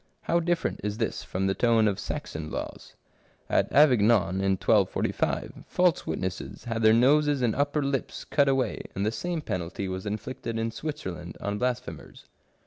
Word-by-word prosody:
How 170 - +2
different 170 0 -1
this 105 +2 -2
from 95 +1 -3
the 95 - +2
tone 115 0 +3
of 100 -2 0
Saxon 80 -1 -5
laws. - - -6 0.5
At - - +1
Avignon, 115 - +4
in 95 0 +3
1245, - - 0
false 180 -2 +2
witnesses 90 +3 -4
had 115 -2 -3
their 110 -1 +6
noses 140 +4 +4
and 115 -3 +2
upper 145 +1 +1
lips 135 -1 -3
cut 140 -2 +2
away, 135 -1 0
and 100 +1 -1
the 110 - +1
same 170 +8 -3
penalty 90 - -4
was 95 +2 -4
inflicted 115 +2 -4
in 115 0 -1
Switzerland 110 - -6
on 100 0 -3
blasphemers. 125 - -4
115 Hz, 155 wpm, -27 LUFS, 95-140 Hz, 0.5 s, their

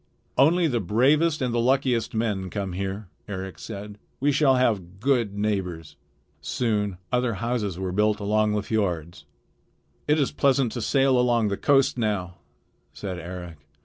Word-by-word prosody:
"Only 165 +7 +4
the 125 -7 +1
bravest 135 - +2
and 125 -2 -1
the 120 - +1
luckiest 125 -2 +1
men 105 -4 -1
come 95 -1 -4
here," 95 +2 -4 0.2
Eric 95 -2 -6
said. 105 -1 -8 0.2
"We 145 +2 +2
shall 135 -2 +4
have 100 -8 0
good 120 -5 +1
neighbors." 90 -7 -2 0.5
Soon 105 -5 -1
other 125 -3 +1
houses 110 -3 -2
were 95 -1 -3
built 105 +2 +2
along 105 +1 +1
the 105 -1 -1
fiords. 85 -8 -2 0.8
"It 150 +1 +3
is 140 - +1
pleasant 135 -4 +2
to 120 - -4
sail 135 +3 +3
along 120 -3 +2
the 100 - -1
coast 135 -3 +3
now," 95 -6 -2 0.6
said 95 -3 -5
Eric. 90 -1 -8
110 Hz, 150 wpm, -25 LUFS, 95-125 Hz, 0.8 s, Only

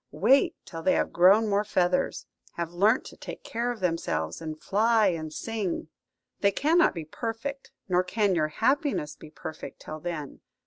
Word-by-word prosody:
Wait 220 - +4
till 165 - -7
they 185 - +3
have - - 0
grown 195 +6 +6
more 205 0 +2
feathers, 180 -3 0 0.3
have 170 -1 -4
learnt 210 +8 +3
to - - -10
take - - -9
care 235 +2 -2
of 240 -4 -4
themselves, 125 - -1
and 155 -1 -6
fly 220 +2 +3
and 160 -3 -4
sing. 200 -2 -3 0.5
They 200 - +4
cannot 325 - +3
be 165 -2 -5
perfect, 235 - -5 0.2
nor 180 -1 +2
can 200 +2 +1
your 155 -3 +2
happiness 230 - 0
be 155 - -13
perfect, 155 0 -8
till 155 - -7
then. 155 -4 -5
185 Hz, 170 wpm, -27 LUFS, 160-225 Hz, 0.5 s, grown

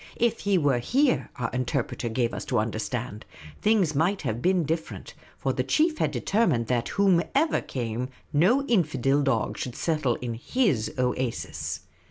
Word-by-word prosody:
If 230 -1 +1
he 200 -2 +2
were 140 -6 +2
here, 255 - +1
our 115 -2 -3
interpreter 125 -1 -2
gave 115 +1 0
us - - -4
to 125 - 0
understand, 110 +1 -3 0.4
things 205 -7 +3
might 170 +7 +1
have 115 +2 -2
been 185 +1 +2
different; 160 +2 -4 0.2
for - - -1
the - - -1
chief 315 0 +2
had - - +2
determined 200 - +1
that, 120 0 -1
whatever 200 - +3
came, 120 0 -4 0.2
no 215 - +4
infidel 145 - +2
dog 135 -6 0
should 125 - -4
settle 150 -7 0
in 120 -2 -4
his 135 - 0
oasis. 125 -1 -2
140 Hz, 155 wpm, -26 LUFS, 120-195 Hz, 0.4 s, no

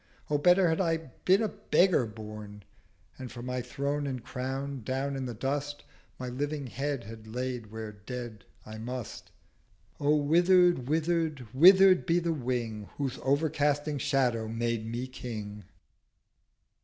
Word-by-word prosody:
O 145 - +2
better 180 +3 +5
had 160 +2 +1
I 165 -3 +2
been 180 - +1
a - - +2
Beggar 180 - +2
born, 105 -1 -9 0.6
And 130 -2 -7
for 120 -1 -8
my 125 0 -2
Throne 140 +4 -2
and 130 -3 -4
Crown, 135 +2 -4
down 135 +3 -2
in 130 -1 -3
the 120 - -5
Dust 145 +4 -3 0.3
My 125 - -5
living 145 +3 -3
Head 135 +1 -3
had 110 0 -10
laid 125 0 -4
where 110 -1 -6
Dead 110 0 -7 0.2
I 110 0 -8
must! 125 0 -6 0.7
O 145 +1 +3
wither'd, 175 -1 +4
wither'd, 160 -3 0
wither'd, 185 +6 +7
be 170 0 +3
the 170 -1 0
Wing 120 -6 -3
Whose 135 -3 -2
overcasting 145 0 +1
Shadow 120 -4 +1
made 115 0 -2
me 120 +2 -3
King!' 105 -5 -7
130 Hz, 145 wpm, -29 LUFS, 115-150 Hz, 0.7 s, wither'd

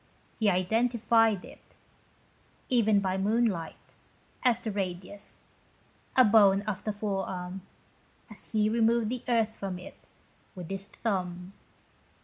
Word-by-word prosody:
He 215 -2 +3
identified 225 +2 +2
it, - - -16 0.9
even 220 -5 +3
by 190 -1 -1
moonlight, 210 -4 -1 0.5
as 245 -2 +3
the 230 -3 -4
radius, 195 0 -5 0.7
a 255 - +8
bone 200 -2 +5
of 205 -2 -4
the 215 - 0
forearm, 195 -3 -4 0.7
as 215 -4 -13
he 215 -1 +2
removed 230 0 +2
the 250 0 -3
earth 225 -2 +1
from 190 -2 -5
it, 180 - -11 0.6
with 180 -1 -8
his 195 0 -5
thumb. 180 -3 -3
205 Hz, 120 wpm, -29 LUFS, 190-225 Hz, 0.9 s, a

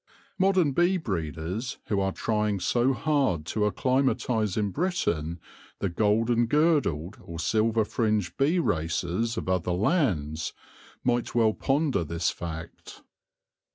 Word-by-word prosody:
Modern 185 -5 +3
bee 175 +7 +3
breeders 90 - -3
who 100 - 0
are 95 0 +1
trying 105 -1 -1
so 120 +7 +2
hard 135 - 0
to 105 +5 0
acclimatise 120 -4 0
in 105 -2 0
Britain 85 - -1 0.4
the 100 - -1
golden 115 +5 +2
girdled 130 - +1
or 85 -5 -8
silver 110 +6 +1
fringed 105 -4 0
bee 150 +6 +2
races 90 - -1
of - - -4
other 90 -1 0
lands, 90 - 0 0.5
might 120 -1 0
well 110 -2 +4
ponder 140 - +1
this 85 +2 -1
fact. 85 -1 -8
110 Hz, 120 wpm, -27 LUFS, 85-130 Hz, 0.5 s, well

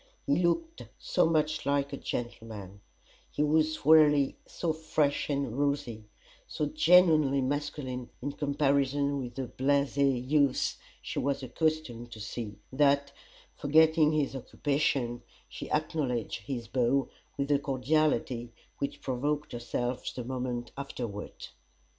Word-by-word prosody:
He 140 - +2
looked 325 - 0
so - - +1
much 155 -1 +1
like 140 0 0
a - - -3
gentleman; 110 -6 -6 0.5
he 150 - -1
was 155 0 +1
really 150 -3 +6
so 165 -2 -2
fresh 155 -3 0
and 140 -5 -1
rosy, 140 -7 -1 0.4
so 150 - -2
genuinely 155 -2 +5
masculine 135 -2 -3
in 145 - -3
comparison 140 -1 +1
with 125 -2 -6
the 135 - -3
blasé 135 -1 +1
youths 140 -2 +2 0.3
she - - -3
was 140 0 -1
accustomed 130 -3 -2
to 110 - -10
see, 105 -1 -6 0.2
that, 140 0 +3 0.4
forgetting 155 +1 +4
his 150 -3 0
occupation, 135 -3 -1 0.3
she - - -8
acknowledged 125 -9 -2
his 120 -4 -4
bow 130 +3 +1 0.3
with 140 +1 -1
a 140 - +4
cordiality 135 -3 0 0.3
which 140 0 -3
provoked 145 +3 -2
herself 120 +1 -3
the 125 - -4
moment 125 -1 -4
afterward. 120 -7 -6
140 Hz, 125 wpm, -30 LUFS, 125-150 Hz, 0.5 s, really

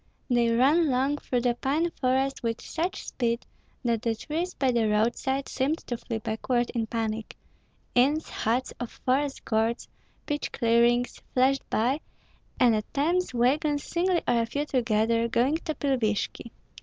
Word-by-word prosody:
They 240 -1 +3
ran 285 +8 +4
long 270 +3 +1
through 245 -1 -1
the 245 0 +2
pine 295 +8 0
forest 265 0 0
with 230 -1 -2
such 345 +3 -3
speed 235 -1 -1 0.4
that 230 -2 +1
the 230 -2 0
trees 325 +10 -3
by 265 -2 +2
the 230 -3 +2
roadside 240 +6 0
seemed 275 +5 0
to 240 - -3
flee 230 -1 -4
backward 240 +3 -1
in 230 -2 -2
panic; 225 -1 -3 0.6
inns, 285 +6 +3
huts 240 +4 -1
of 245 - -4 0.2
forest 270 +2 0
guards, 225 +1 0 0.4
pitch 295 -1 -2
clearings, 235 +1 +2
flashed 265 +1 +2
by, 250 +7 +1 0.6
and 245 -3 +5
at 215 -1 -2
times 345 +6 +1
wagons 285 +4 +2
singly 350 0 0
or 235 -1 +3
a 230 - -1
few 285 +5 -2
together, 230 -3 +1
going 250 +6 +2
to 315 -2 -4
Pilvishki. 235 -4 -1
250 Hz, 155 wpm, -27 LUFS, 230-285 Hz, 0.6 s, and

